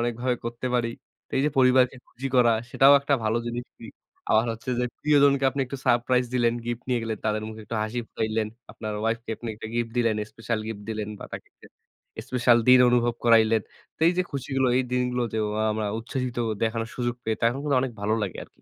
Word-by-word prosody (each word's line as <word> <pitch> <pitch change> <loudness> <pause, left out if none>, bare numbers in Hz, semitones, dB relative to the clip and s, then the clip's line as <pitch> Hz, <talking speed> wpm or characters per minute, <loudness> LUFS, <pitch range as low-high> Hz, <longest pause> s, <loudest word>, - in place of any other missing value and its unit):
অনেকভাবে 120 +1 0
করতে 120 +2 -4
পারি। 120 -1 +1 0.4
তো - - -64
এই - - +2
যে, - - +1
পরিবারকে 130 0 +4
খুশি 135 +3 -6
করা 120 -2 +6 0.2
সেটাও 135 +1 +6
একটা 140 0 +1
ভালো 110 +2 +1
জিনিস। 120 +1 -3 0.2
ই - - -7 0.4
আবার 110 +2 +4
হচ্ছে 115 +3 -6
যে, - - +1 0.2
প্রিয়জনকে 140 -2 +4
আপনি 135 +1 -3
একটু 140 - -6
সারপ্রাইজ 125 +1 +3
দিলেন, 120 -2 +3
গিফট 120 0 -4
নিয়ে 125 -2 +1
গেলেন, 110 -2 -3
তাদের 110 0 0
মুখে 110 0 -9
একটু 110 +2 -4
হাসি 110 +3 -3
ফুটাইলেন। 110 -1 -1 0.2
আপনার 110 -1 -5
উয়াইফ 115 +1 0
কে - - -7
আপনি 120 - -7
একটা 110 - -8
গিফট 120 -1 -1
দিলেন, 115 -2 +2 0.2
স্পেশাল 115 0 -3
গিফট 105 -2 -6
দিলেন 105 -1 -3
বা - - -8
তাকে - - -7
একটা - - -18 0.6
স্পেশাল 125 -2 +4
দিন 130 - +9
অনুভব 120 -1 +2
করাইলেন। 110 -2 +5 0.3
তো - - -36
এই 175 - +3
যে, - - +4
খুশিগুলো 135 -1 0
এই 130 - +3
দিনগুলো 125 0 0
যে, - - 0 0.3
আমরা 110 0 -2
উচ্ছ্বসিত 125 +2 -4 0.3
দেখানোর 115 0 -1
সুযোগ 120 -1 -1
পেয়ে 110 0 0
তখন 115 +3 +2
কিন্তু 145 -3 +1
অনেক 130 - -3
ভালো 110 +2 +1
লাগে 95 -3 -4
আরকি। - - -21
120 Hz, 210 wpm, -25 LUFS, 115-125 Hz, 0.6 s, দিন